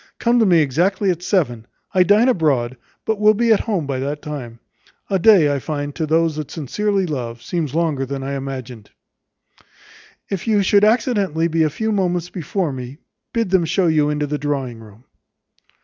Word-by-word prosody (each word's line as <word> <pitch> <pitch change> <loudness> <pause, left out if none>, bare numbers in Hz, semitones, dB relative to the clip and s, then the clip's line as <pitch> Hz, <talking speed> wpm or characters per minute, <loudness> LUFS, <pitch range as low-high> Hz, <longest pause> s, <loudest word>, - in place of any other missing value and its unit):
Come 240 +1 +2
to 225 - +4
me 170 -3 +5
exactly 180 +8 +1
at 175 -1 -4
seven; 140 - -1 0.3
I 185 - +4
dine 205 +6 +4
abroad, 140 - +1 0.3
but 220 -2 -1
will 215 0 +5
be 230 +1 +3
at 210 - +2
home 200 -9 -2
by 135 -2 -3
that 145 +3 -4
time. 125 -6 -7 0.5
A 190 - +2
day, 175 -7 +5
I 140 - -1
find, 145 0 -4
to 160 0 -3
those 160 0 +1
that 155 -2 -5
sincerely 195 +6 -1
love, 120 -7 -5
seems 155 0 -3
longer 160 -5 0
than 135 0 -5
I 140 +1 -4
imagined. 130 -5 -6 1.4
"If 195 +2 -4
you 210 -3 +3
should 200 +1 +3
accidentally 205 - +2
be 165 0 0
a 155 - +3
few 220 +9 -2
moments 180 -4 -1
before 175 -2 -2
me, 130 +1 -7 0.3
bid 230 -5 -1
them 190 -3 +4
show 185 +3 +1
you 155 -3 +2
into 150 0 -1
the 145 0 -3
drawing 135 -5 -3
room." 110 +1 -15
160 Hz, 185 wpm, -20 LUFS, 140-195 Hz, 1.4 s, me